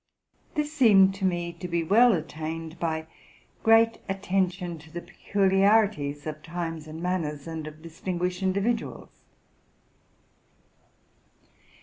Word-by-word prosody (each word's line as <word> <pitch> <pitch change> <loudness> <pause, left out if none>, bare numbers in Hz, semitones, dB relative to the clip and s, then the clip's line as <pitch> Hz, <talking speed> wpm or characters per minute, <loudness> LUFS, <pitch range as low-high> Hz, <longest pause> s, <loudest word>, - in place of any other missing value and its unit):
This 300 0 -1
seemed 200 -9 +6
to 195 0 -3
me*to 175 0 -2
be 170 -1 0
well 230 +8 +5
attained 160 0 -5
by 160 -1 -2 0.6
great 225 0 +5
attention 185 -3 -1
to 155 +1 -15
the 175 +2 -6
peculiarities 195 -6 +2
of 155 -1 -5
times 165 -1 -5
and 160 +2 -8
manners 155 -6 -2
and 160 -2 -5
of 155 +1 -11
distinguished 180 +2 -3
individuals. 200 +5 -1
175 Hz, 105 wpm, -27 LUFS, 160-195 Hz, 0.6 s, seemed